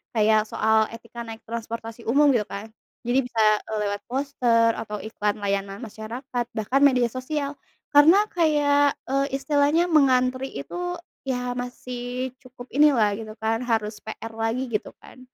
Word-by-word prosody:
kayak 215 0 +3
soal 220 0 +2
etika 230 +1 -9
naik 225 0 -9
transportasi 230 0 -6
umum, 285 +5 +5
gitu 225 -5 +1
kan. 210 +2 -7 0.3
Jadi 245 +2 +2
bisa, 230 -3 +1 0.3
eee, 220 - -2
lewat 205 0 -2
poster 245 -3 +2
atau 210 -2 -5
iklan 210 -1 -1
layanan 200 +2 -2
masyarakat, 235 +3 -5
bahkan 220 +5 +1
media 255 -4 +4
sosial. 280 +2 -4 0.3
Karena 320 +8 +7
kayak, 290 -4 +3
eee, 275 +1 -1
istilahnya 290 +5 +2
mengantri 260 -3 +3
itu, 355 - -4 0.3
ya 250 -1 -1
masih 245 +1 -5
cukup 255 -1 -13
inilah 270 -7 +4
gitu 215 -1 -8
kan, 225 0 -1
harus 215 -2 -1
PR 220 +1 -7
lagi 225 +3 -2
gitu 215 - -3
kan, - - -14
245 Hz, 145 wpm, -24 LUFS, 220-275 Hz, 0.3 s, Karena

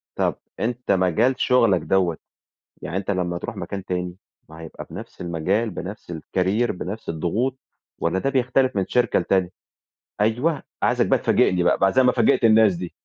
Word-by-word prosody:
طب - - 0 0.2
أنت 120 -1 -2
مجال 100 +7 +2
شُغلَك 115 - +3
دوّة، 90 -3 +1 0.6
يعني 85 +4 -4
أنت 100 +1 -2
لمّا 90 -2 -1
تروح 115 +5 -6
مكان 95 +1 -6
تاني، 90 -1 -3 0.3
ما 80 +1 -12
هيبقى 80 - -9
بنفس - - -9
المجال 90 +7 0
بنفس 95 0 -7
الCareer 95 +8 0
بنفس 95 +3 -6
الضغوط، 110 +12 -1 0.4
والّا 85 +3 0
ده 135 - 0
بيختلف 130 -1 +1
من 95 -2 +1
شركة 120 -5 +2
لتانية؟ 90 0 +1 0.7
أيوه، 125 +8 +1 0.2
عايزَك - - +3
بقى - - +3
تفاجئني 90 -1 +2
بقى، - - +3
بقي 95 0 +2
زي 130 - +4
ما 125 - +5
فاجئت - - +2
الناس 110 -4 +5
دي. 90 0 -6
95 Hz, 165 wpm, -23 LUFS, 90-120 Hz, 0.7 s, ما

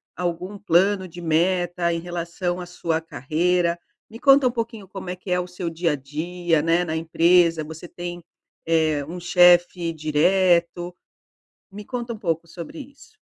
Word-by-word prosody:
algum 180 +3 -3
plano 190 0 +2
de 175 +1 -11
meta 175 +1 +1
em 170 - -1
relação 175 +1 -4
à - - -6
sua 165 -2 -2
carreira? 170 +4 0 0.3
Me 225 +1 -12
conta 275 -1 +6
um - - +1
pouquinho 225 -4 -5
como 190 -1 -8
é 180 - -3
que 185 0 -8
é 180 - +2
o 180 - -3
seu 180 -1 -6
dia 165 -1 0
a - - 0
dia, 160 +4 -1
né, 165 +2 +2
na 160 -1 -3
empresa. 165 0 +3
Você 160 +3 -9
tem, 175 0 -7 0.4
eh, 155 -3 +2
um 175 +2 -6
chefe 175 -1 +4
direto? 175 +3 +1 0.8
Me 205 +1 -9
conta 240 -1 -4
pouco 170 -6 -2
sobre 170 - -9
isso. 285 +10 -14
175 Hz, 160 wpm, -23 LUFS, 165-185 Hz, 0.8 s, conta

